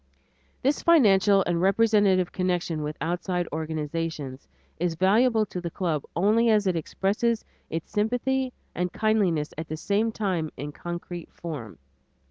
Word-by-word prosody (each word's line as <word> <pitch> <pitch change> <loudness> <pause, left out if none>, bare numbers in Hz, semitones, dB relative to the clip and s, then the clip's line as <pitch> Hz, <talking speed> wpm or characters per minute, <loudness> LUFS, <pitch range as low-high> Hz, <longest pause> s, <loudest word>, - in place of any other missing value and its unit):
This 275 +3 +2
financial 205 - +5
and 175 -1 0
representative 195 -2 +3
connection 180 -3 -1
with 150 0 -4
outside 175 +1 -1
organizations, 155 -3 -4 0.3
is 170 -1 0
valuable 215 +6 +3
to 180 -3 -6
the 170 - -3
club 165 -4 -1
only 215 +6 +3
as 210 -2 +3
it 185 -2 +1
expresses 205 +8 0 0.2
its 165 0 -5
sympathy 245 +5 0 0.2
and 180 0 -2
kindliness 195 -9 +1
at 160 - -5
the 155 - -4
same 210 +6 0
time 185 -8 -1
in 145 +1 -5
concrete 175 +2 -7
form. 145 - -7
180 Hz, 135 wpm, -26 LUFS, 165-215 Hz, 0.3 s, financial